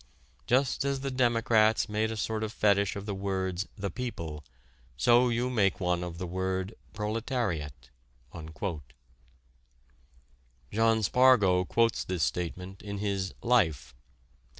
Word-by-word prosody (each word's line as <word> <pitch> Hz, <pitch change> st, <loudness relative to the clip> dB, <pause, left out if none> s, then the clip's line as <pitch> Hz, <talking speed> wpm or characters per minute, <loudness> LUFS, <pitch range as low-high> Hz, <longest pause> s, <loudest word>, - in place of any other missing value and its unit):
Just 130 Hz, +1 st, +2 dB
as 140 Hz, -1 st, -1 dB
the 135 Hz, 0 st, -3 dB
democrats 115 Hz, -4 st, +3 dB
made 110 Hz, +1 st, 0 dB
a 110 Hz, -, -4 dB
sort 110 Hz, +1 st, -2 dB
of 110 Hz, -, -3 dB
fetich 100 Hz, -2 st, +2 dB
of 100 Hz, 0 st, -6 dB
the 105 Hz, -, -3 dB
words, 95 Hz, -1 st, -2 dB
'the 100 Hz, -1 st, -3 dB
people,' 85 Hz, -12 st, -5 dB, 0.5 s
so 120 Hz, -, +4 dB
you 120 Hz, +1 st, 0 dB
make 105 Hz, -7 st, +1 dB
one 90 Hz, -1 st, 0 dB
of 85 Hz, -1 st, -6 dB
the 90 Hz, -, -4 dB
word 95 Hz, +2 st, -2 dB, 0.2 s
'proletariat.'" 105 Hz, -, -3 dB, 2.8 s
John 115 Hz, 0 st, +3 dB
Spargo 105 Hz, -6 st, +4 dB
quotes 115 Hz, +4 st, +1 dB
this 90 Hz, -4 st, -2 dB
statement 90 Hz, +7 st, -3 dB
in 100 Hz, -1 st, -6 dB
his 100 Hz, -2 st, -2 dB
"Life." 80 Hz, -, +2 dB
100 Hz, 125 wpm, -29 LUFS, 90-115 Hz, 2.8 s, so